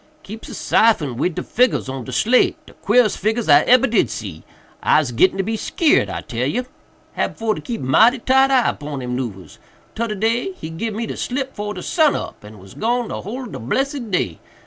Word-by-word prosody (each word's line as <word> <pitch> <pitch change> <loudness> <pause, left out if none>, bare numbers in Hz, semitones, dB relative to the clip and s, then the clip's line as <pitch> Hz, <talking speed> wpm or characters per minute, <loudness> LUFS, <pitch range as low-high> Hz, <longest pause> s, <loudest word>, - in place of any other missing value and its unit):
"Keeps 220 +3 -9
a - - -7
syphon 165 - +2
wid 155 +7 -1
de - - -3
figgurs 250 - +1
on 130 -2 -5
de - - -7
slate—de 250 +3 +1
queerest 245 -4 +3
figgurs 220 +3 -1
I 145 -1 +7
ebber 255 +1 +5
did 220 - +2
see. 100 -7 -7 0.4
Ise 150 -5 +3
gittin' 185 +11 +3
to 195 - 0
be 220 +3 -2
skeered, 300 +7 +2
I - - -4
tell 120 +2 -3
you. 245 - -2 0.5
Hab - - -2
for 225 -1 0
to - - -7
keep 235 -3 -5
mighty 220 - +4
tight 265 +2 +3
eye 260 -3 +3
'pon 145 -3 -6
him 125 0 -3
'noovers. 100 - -6 0.3
Todder 225 -1 -2
day 230 - 0
he 160 - -8
gib 210 +6 -4
me 225 +1 -3
slip 265 +1 -3
'fore 210 0 -4
de - - -7
sun 310 -4 +2
up - - -6
and 105 +1 -12
was 95 0 -14
gone 240 +1 -1
de - - -5
whole 245 +7 -6
ob 240 - -9
de - - -7
blessed 265 - -2
day. 95 - -1
215 Hz, 215 wpm, -20 LUFS, -, 0.5 s, I